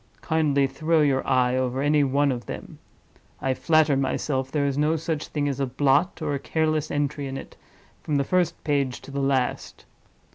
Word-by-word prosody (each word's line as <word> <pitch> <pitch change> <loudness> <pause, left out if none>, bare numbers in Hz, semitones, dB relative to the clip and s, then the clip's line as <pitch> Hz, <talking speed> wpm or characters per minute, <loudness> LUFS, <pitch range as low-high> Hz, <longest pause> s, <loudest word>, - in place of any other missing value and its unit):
Kindly 150 -4 +2
throw 155 +4 +1
your 140 -3 +2
eye 125 -1 +2
over 130 0 -1
any 145 +1 +3
one 140 +1 +2
of 120 -2 -5
them. - - -8 0.6
I 135 - 0
flatter 155 0 +3
myself 135 0 -1
there 145 -2 0
is 140 -1 0
no 150 +3 +2
such 160 -1 -3
thing 145 -2 -2
as 140 -1 -2
a 135 - 0
blot, 145 +6 +1
or 150 -2 -1
a 140 - -1
careless 155 0 0
entry 145 -1 -2
in 135 0 -5
it, - - -10 0.5
from 150 - -2
the 140 - +2
first 180 +4 0
page 140 -4 0
to - - -11
the 140 - -3
last. 135 -2 -1
140 Hz, 190 wpm, -25 LUFS, 135-155 Hz, 0.6 s, any